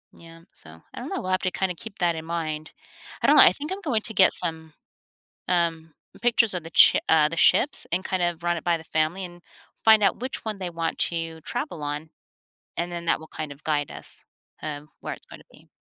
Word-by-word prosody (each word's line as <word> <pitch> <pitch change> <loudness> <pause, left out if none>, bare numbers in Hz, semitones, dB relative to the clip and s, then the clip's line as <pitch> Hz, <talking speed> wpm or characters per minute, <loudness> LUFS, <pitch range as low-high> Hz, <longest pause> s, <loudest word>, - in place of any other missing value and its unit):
Yeah, 165 0 -14
so 80 0 -11
I - - -8
don't - - -6
know, - - -3
we'll 185 - -3
have 185 - +1
to 185 - -1
kinda 190 -2 -1
keep 210 +4 -10
that 170 -2 +2
in 160 - -6
mind. 155 -2 -4 0.5
I - - +2
don't - - +6
know, - - +9
I - - +8
think 300 +4 -6
I'm 395 +1 -4
going 240 - 0
to 220 - -4
get 190 -3 +6
some, 160 -2 +1 0.7
um, 165 -3 0 0.3
pictures 235 -3 +3
of 175 - -3
the 165 - -9
ch - - +7
uh, 155 -2 +5
the 170 - -6
ships 290 - +3
and 180 +2 0
kind 185 -2 -1
of 175 -1 -1
run 175 0 +1
it 165 - -7
by 170 -1 +2
the 160 - -12
family 160 +4 -1
and 175 0 -12 0.4
find 220 -1 +7
out 195 - +3
which 260 - -4
one 215 -2 -3
they 185 -2 -4
want 165 -1 -3
to 165 -1 -2
travel 240 - -4
on, 150 +2 -4 0.7
and 175 +1 -2
then 170 -1 -5
that - - +2
will 160 - -12
kind 155 -2 -6
of 140 - -15
guide 145 -2 0
us, - - -6 0.4
um, 150 -1 -6
where - - -5
it's - - -14
gonna - - -13
be. - - -19
170 Hz, 235 wpm, -25 LUFS, 160-185 Hz, 0.7 s, know